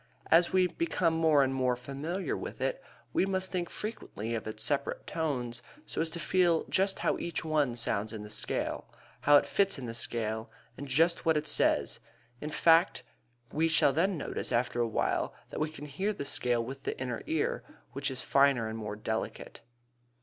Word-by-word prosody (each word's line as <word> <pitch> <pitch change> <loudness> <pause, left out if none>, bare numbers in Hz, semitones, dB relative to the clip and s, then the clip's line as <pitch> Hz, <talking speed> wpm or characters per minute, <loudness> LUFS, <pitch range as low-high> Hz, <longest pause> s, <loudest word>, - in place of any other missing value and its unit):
As 170 +1 +6
we 185 -1 +4
become 180 - 0
more 160 -3 +4
and 135 0 0
more 130 -1 +1
familiar 140 +9 -3
with - - -6
it - - -1 0.3
we - - +3
must 190 -1 -1
think 175 -2 -2
frequently 115 - -5
of 115 -1 -3
its 110 0 -1
separate 140 +1 0
tones 125 -7 -2 0.2
so - - -3
as 165 - +1
to 170 - -5
feel 175 0 +3
just 195 +1 +2
how - - 0
each 170 -1 -3
one 150 -6 +1
sounds 110 -3 -1
in 110 -2 -6
the 105 - -9
scale, - - -2 0.3
how 145 0 +7
it - - +3
fits 195 -4 +2
in 130 - -6
the 115 - -5
scale, 110 -1 -2 0.3
and 140 - -7
just 165 +6 +3
what 160 -2 +3
it 150 0 -2
says, - - +2 0.4
in 150 - -4
fact; 165 -3 +4 0.5
we 160 +2 +2
shall 160 -4 +4
then 180 +5 +2
notice - - -3
after 120 0 +1
a 120 - +2
while 110 - 0 0.2
that - - -4
we 155 0 0
can 150 -2 -9
hear 190 +9 -2
the 140 - -5
scale 120 -3 0
with 135 +2 -7
the - - -4
inner 125 -2 -3
ear, 160 -2 0 0.3
which 140 +1 -1
is 130 -1 -3
finer 135 -5 +3
and 110 +1 -5
more 105 -1 -4
delicate. 110 +1 -4
145 Hz, 195 wpm, -30 LUFS, 120-165 Hz, 0.5 s, how